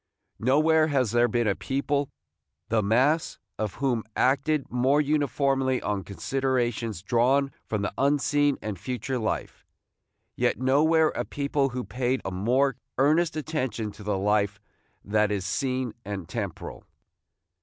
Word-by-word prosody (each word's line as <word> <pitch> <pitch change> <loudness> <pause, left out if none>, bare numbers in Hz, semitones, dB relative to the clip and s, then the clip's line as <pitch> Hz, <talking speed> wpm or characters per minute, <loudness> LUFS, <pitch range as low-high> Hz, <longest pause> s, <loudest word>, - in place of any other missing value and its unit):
Nowhere 155 +6 +4
has 130 -7 +1
there 120 +1 +4
been 120 0 0
a 100 - +3
people, 140 +4 -1 0.6
the 115 -1 +2
mass 130 +10 +2 0.2
of 105 -3 -2
whom 125 -5 0
acted 140 +2 +2
more 130 +4 +3
uniformly 140 -3 +1
on 100 -2 -2
considerations 120 -3 -2
drawn 130 +6 +2 0.2
from 105 -2 -2
the 105 - -2
unseen 145 +1 +2
and 105 -4 -4
future 125 +3 -3
life; 110 - -3 0.7
yet - - +1
nowhere 155 +5 +3
a - - -3
people 140 -1 -1
who 125 0 -4
paid 130 +1 -1
a - - -2
more 125 +8 +1 0.2
earnest 155 +5 +3
attention 130 -9 -2
to 105 - -14
the 105 -1 -1
life 100 0 +1 0.5
that 105 0 +2
is 100 -3 -2
seen 130 +2 -1
and 95 -4 -5
temporal. - - -5
130 Hz, 135 wpm, -26 LUFS, 110-140 Hz, 0.7 s, Nowhere